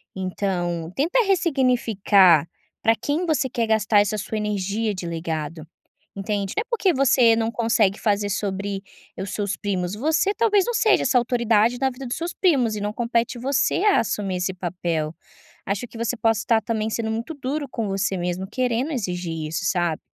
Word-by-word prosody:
então, 180 -3 -2
tenta 330 - +1
ressignificar 235 - +3 0.3
para 225 0 +3
quem 300 +9 -2
você 300 -5 0
quer 230 -2 -1
gastar 220 -1 +3
essa 210 +1 -1
sua 215 +2 -4
energia 210 +1 -1
de 180 - -6
legado, 160 -1 -4 0.5
entende? 200 0 -2
Não - - +3
é - - -7
porque 420 -7 +2
você 255 -4 +4
não 225 0 0
consegue 220 -4 +1
fazer 205 -2 0
sobre 200 0 -3 0.4
os 190 +1 -4
seus 205 -1 -2
primos, 185 -3 -2
você 315 - +1
talvez 420 -3 +3
,não 480 - -2
seja 435 -2 +3
essa 255 0 +3
autoridade 235 -1 +2
na 265 - +2
vida 260 +1 -8
dos 240 - -2
seus 340 +1 -4
primos 265 - +2
e - - -5
não 210 0 -2
compete 235 +1 -1
você, 275 +8 +1
a 415 -2 +5
assumir 200 -4 -2
esse 180 +1 -2
papel. 170 -3 -3 0.5
Acho 205 +5 -2
que 230 - -12
você 230 +2 -1
possa 225 -2 +2
estar 225 -1 +2
também, 220 0 -2
sendo 220 0 -2
muito 230 +8 -4
duro 285 +2 -3
com 225 -3 -2
você 195 0 -1
mesmo, 180 +2 -3
querendo 250 +4 -1
exigir 180 - -3
isso 165 +3 -3
sabe. 175 -3 0
220 Hz, 180 wpm, -23 LUFS, 190-250 Hz, 0.5 s, a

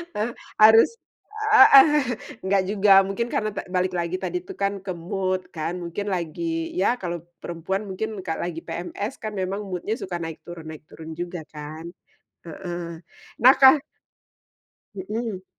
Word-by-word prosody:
Eh, 215 +3 -1 0.3
harus 220 +1 +8 0.6
heeh. 415 -2 +9 0.6
Nggak 195 0 +2
juga, 205 -1 +3 0.2
mungkin 235 +4 -2
karena 215 -1 0
ta - - -3
balik 185 0 0
lagi 170 +1 -1
tadi 180 -1 -3
tuh - - -10
kan, 200 0 +1
ke 185 - -3
mood 185 +2 -3
kan, 160 +2 -2
mungkin 200 +5 -5
lagi 330 - -3
ya - - +3
kalau 175 -1 -3 0.2
perempuan 175 +4 -3
mungkin 205 +4 -3 0.2
ka 160 - -2
lagi 170 -2 -4
PMS 190 +4 -4
kan 215 - -3
memang 190 +2 -2
mood-nya 190 +4 -3
suka 180 -2 -4
naik 165 -1 -6
turun 165 -2 -9
naik 155 -1 -10
turun 160 0 -10
juga 175 0 -4
kan. 155 +2 -8 0.6
Heeh. 170 0 -6 0.4
Nah 260 +2 +9
ka 265 +3 +8 1.2
Mhm. 205 0 -4
185 Hz, 150 wpm, -24 LUFS, 170-210 Hz, 1.2 s, heeh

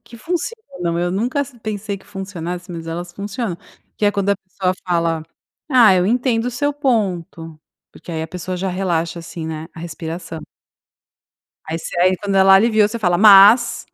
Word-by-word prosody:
que 235 - -13
funcionam, 285 - -4
eu 175 0 0
nunca 240 +9 -1
ass 280 0 -4
pensei 210 -1 -4
que - - -22
funcionasse, 180 -3 -6
mas 165 -1 -7
elas 175 +2 -5
funcionam, 200 -1 -4 0.4
que 210 - -1
é 205 - +3
quando 200 0 0
a 200 - +2
pessoa 185 -1 -3
fala: 165 -2 0 0.4
"Ah, 240 -7 +6
eu 180 0 +2
entendo 240 0 +1
o - - -1
seu 285 +4 -1
ponto". 180 - -2 0.3
Porque 170 - -10
aí 160 0 -3
a 160 - -6
pessoa 180 +1 -5
já 190 +1 -2
relaxa 175 -2 -1
assim, 165 0 -7
né, 160 0 -5
a 160 - -10
respiração. 165 0 -6 1.3
Aí 160 +1 -3
você 170 +1 -6
aí, 185 +1 +4
quando 200 0 -3
ela 195 0 +7
aliviou, 215 0 +4
você 235 +2 -5
fala: 175 -4 +1
"Mas". 210 +3 +7
190 Hz, 180 wpm, -19 LUFS, 170-220 Hz, 1.3 s, ela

